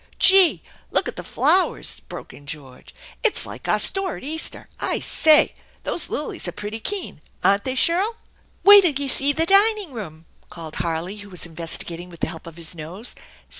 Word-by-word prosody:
"Gee! 385 Hz, -3 st, +6 dB, 0.3 s
Look -, -, 0 dB
at -, -, -5 dB
the -, -, -7 dB
flowers!'* 370 Hz, 0 st, +1 dB
broke -, -, -11 dB
in 145 Hz, -, -16 dB
George. 135 Hz, -4 st, -9 dB, 0.3 s
"Itffl 455 Hz, -, +1 dB
like -, -, -10 dB
our -, -, +2 dB
store 385 Hz, -3 st, +4 dB
at -, -, -13 dB
Easter! 315 Hz, +4 st, -3 dB
I -, -, -1 dB
say! 310 Hz, -2 st, +5 dB, 0.3 s
Those 345 Hz, -, -2 dB
lilies 295 Hz, -9 st, -4 dB
are -, -, -3 dB
pretty 210 Hz, +5 st, -6 dB
keen, 395 Hz, -, -3 dB, 0.2 s
aren't 200 Hz, +1 st, +2 dB
they, 260 Hz, -, -2 dB
Shirl?" 370 Hz, -, 0 dB, 0.5 s
"Wait'll 390 Hz, -8 st, +7 dB
you 280 Hz, -, -2 dB
see 275 Hz, +1 st, +3 dB
the 320 Hz, +3 st, -1 dB
dining 400 Hz, -1 st, +3 dB
room!" 165 Hz, -8 st, -9 dB, 0.2 s
called 160 Hz, -2 st, -9 dB
Harley, 170 Hz, +4 st, -3 dB
who 205 Hz, -1 st, -12 dB
was 180 Hz, -2 st, -3 dB
investigating 170 Hz, +1 st, -3 dB
with 170 Hz, -2 st, -14 dB
the -, -, -1 dB
help 165 Hz, -, -9 dB
of 165 Hz, 0 st, -11 dB
his 165 Hz, -1 st, -3 dB
nose. 175 Hz, +8 st, -5 dB
225 Hz, 180 wpm, -21 LUFS, -, 0.5 s, Wait'll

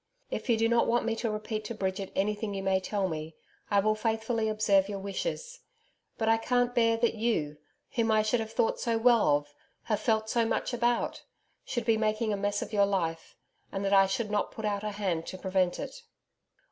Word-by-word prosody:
If -, -, -4 dB
you 230 Hz, -, +4 dB
do 225 Hz, +1 st, +3 dB
not 235 Hz, 0 st, +3 dB
want 240 Hz, 0 st, +2 dB
me 230 Hz, -1 st, 0 dB
to 230 Hz, -, -1 dB
repeat 215 Hz, 0 st, -3 dB
to 235 Hz, -, -5 dB
Bridget 190 Hz, -1 st, -3 dB
anything 210 Hz, +1 st, -1 dB
you 195 Hz, -, -3 dB
may 190 Hz, 0 st, +2 dB
tell 195 Hz, 0 st, -1 dB
me, 155 Hz, -1 st, -5 dB, 0.3 s
I 200 Hz, -, +4 dB
will 215 Hz, +2 st, +2 dB
faithfully 220 Hz, +1 st, -1 dB
observe 205 Hz, -2 st, +3 dB
your 200 Hz, -, -3 dB
wishes. 485 Hz, -, -4 dB, 0.6 s
But 220 Hz, -, -1 dB
I 225 Hz, 0 st, +5 dB
can't 245 Hz, +1 st, +1 dB
bear 230 Hz, -2 st, +3 dB
that 235 Hz, 0 st, +2 dB
you, 210 Hz, -10 st, -1 dB, 0.3 s
whom 230 Hz, -1 st, 0 dB
I 215 Hz, -1 st, +4 dB
should 215 Hz, +3 st, +1 dB
have 220 Hz, 0 st, -4 dB
thought 225 Hz, -, +1 dB
so 230 Hz, -1 st, 0 dB
well 225 Hz, -10 st, +5 dB
of 145 Hz, 0 st, -11 dB, 0.3 s
have 215 Hz, -3 st, 0 dB
felt 220 Hz, -2 st, +1 dB
so 230 Hz, +1 st, +2 dB
much 225 Hz, +2 st, -1 dB
about 240 Hz, 0 st, 0 dB, 0.4 s
should 240 Hz, -3 st, -3 dB
be 225 Hz, -2 st, +3 dB
making 215 Hz, 0 st, 0 dB
a -, -, +1 dB
mess 205 Hz, +1 st, -1 dB
of -, -, -10 dB
your 200 Hz, -1 st, +4 dB
life, 165 Hz, -5 st, -2 dB, 0.4 s
and 195 Hz, 0 st, -3 dB
that 195 Hz, -, +1 dB
I 195 Hz, -1 st, +6 dB
should 210 Hz, +2 st, -2 dB
not 210 Hz, -, 0 dB
put 220 Hz, -, -6 dB
out 205 Hz, -1 st, -1 dB
a 215 Hz, -, -1 dB
hand 190 Hz, -6 st, -2 dB
to 185 Hz, -, -6 dB
prevent 185 Hz, -1 st, 0 dB
it. -, -, -7 dB
215 Hz, 215 wpm, -29 LUFS, 195-230 Hz, 0.6 s, I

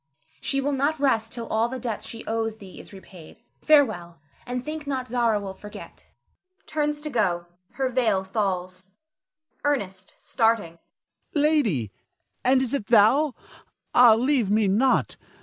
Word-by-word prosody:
She 275 Hz, -, -1 dB
will 285 Hz, +2 st, -1 dB
not 285 Hz, +3 st, 0 dB
rest 230 Hz, -5 st, +1 dB
till 235 Hz, -1 st, -5 dB
all 225 Hz, +2 st, +1 dB
the 260 Hz, -, -5 dB
debt 230 Hz, -4 st, -4 dB
she 230 Hz, -, -9 dB
owes 225 Hz, 0 st, -2 dB
thee 195 Hz, -3 st, -12 dB
is -, -, -12 dB
repaid. 190 Hz, 0 st, -14 dB, 0.2 s
Farewell, 215 Hz, -, +2 dB, 0.3 s
and 250 Hz, 0 st, -4 dB
think 305 Hz, -1 st, -6 dB
not 260 Hz, -2 st, -2 dB
Zara 230 Hz, -3 st, +1 dB
will 195 Hz, -1 st, -6 dB
forget 210 Hz, +1 st, -12 dB, 0.6 s
[turns 300 Hz, -1 st, -2 dB
to 300 Hz, 0 st, -5 dB
go; 180 Hz, -8 st, 0 dB, 0.3 s
her 265 Hz, -1 st, -1 dB
veil 230 Hz, -7 st, +1 dB
falls]. 190 Hz, -2 st, -3 dB, 0.7 s
Ernest 195 Hz, -10 st, -2 dB
[starting]. 225 Hz, -8 st, 0 dB, 0.6 s
Lady! 285 Hz, -, +1 dB, 0.5 s
and 260 Hz, +1 st, +3 dB
is 255 Hz, -, -4 dB
it 225 Hz, -8 st, -2 dB
thou? 245 Hz, +6 st, +4 dB, 0.6 s
Ah, 240 Hz, -3 st, +7 dB
leave 250 Hz, -2 st, +1 dB
me 210 Hz, 0 st, +3 dB
not! 235 Hz, +7 st, +2 dB
230 Hz, 145 wpm, -25 LUFS, 195-270 Hz, 0.7 s, Ah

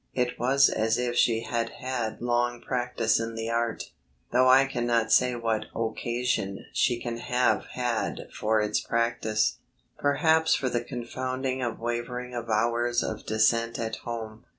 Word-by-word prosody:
It 125 Hz, -1 st, -1 dB
was 135 Hz, +3 st, +5 dB
as 110 Hz, +1 st, +1 dB
if 120 Hz, -1 st, -1 dB
she 115 Hz, -2 st, +3 dB
had 115 Hz, 0 st, -2 dB
had 125 Hz, -4 st, -3 dB
long 120 Hz, 0 st, +1 dB
practice 120 Hz, -3 st, 0 dB
in 115 Hz, 0 st, -4 dB
the 115 Hz, 0 st, -3 dB
art, 115 Hz, -1 st, -2 dB, 0.4 s
though 130 Hz, +1 st, +4 dB
I 135 Hz, +1 st, +7 dB
cannot 120 Hz, -4 st, 0 dB
say 125 Hz, +2 st, +4 dB
what 115 Hz, -2 st, -1 dB
occasion 115 Hz, -2 st, -2 dB
she 120 Hz, -2 st, +2 dB
can 120 Hz, -1 st, -4 dB
have 125 Hz, +1 st, +1 dB
had 120 Hz, -3 st, -1 dB
for 110 Hz, 0 st, +1 dB
its 105 Hz, 0 st, 0 dB
practice 115 Hz, -2 st, 0 dB, 0.4 s
perhaps 160 Hz, +3 st, +3 dB
for 130 Hz, -, -1 dB
the 120 Hz, -1 st, -1 dB
confounding 130 Hz, +1 st, -3 dB
of 120 Hz, -2 st, -2 dB
wavering 120 Hz, +1 st, -4 dB
avowers 120 Hz, +1 st, 0 dB
of 110 Hz, -, -5 dB
Dissent 115 Hz, +2 st, +2 dB
at 110 Hz, -1 st, -3 dB
home. 115 Hz, -2 st, -7 dB
120 Hz, 150 wpm, -27 LUFS, 115-125 Hz, 0.4 s, I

